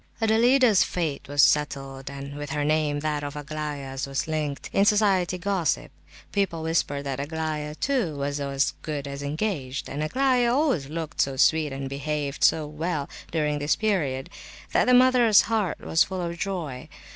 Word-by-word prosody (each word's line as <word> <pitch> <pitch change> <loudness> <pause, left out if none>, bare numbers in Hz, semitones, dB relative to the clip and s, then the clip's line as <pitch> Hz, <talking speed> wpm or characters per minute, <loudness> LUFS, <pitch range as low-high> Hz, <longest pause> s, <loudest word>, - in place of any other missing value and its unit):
Adelaida's 230 0 +4
fate 160 -6 -3
was 145 -1 +3
settled; 135 -2 +1
and 140 0 -7
with 145 -1 -6
her 150 0 -1
name 150 -1 +1
that 150 -1 -1
of 145 0 -5
Aglaya's 145 -2 -5
was 135 +2 -2
linked, 150 -3 -3
in 195 - +4
society 200 -4 +3
gossip. 185 -2 -1 0.4
People 190 -5 -1
whispered 160 -3 0
that 140 -1 -4
Aglaya, 150 0 -3
too, 235 - 0
was 140 +1 -2
"as 140 -1 0
good 145 -2 -4
as 140 0 -6
engaged;" 145 -3 -3
and 145 - -4
Aglaya 250 - +2
always 265 - +1
looked 160 0 -3
so 135 -1 0
sweet 155 +2 +3
and 135 0 -4
behaved 140 +1 -3
so 155 -1 +4
well 150 0 -3 0.2
(during 150 -2 0
this 145 +1 +1
period), 150 -12 -1 0.4
that - - +3
the 250 - +4
mother's 245 -4 +6
heart 220 -5 -1
was 160 - +3
full 185 -1 -4
of 170 0 -3
joy. 170 -9 -4
155 Hz, 165 wpm, -25 LUFS, 140-185 Hz, 0.4 s, mother's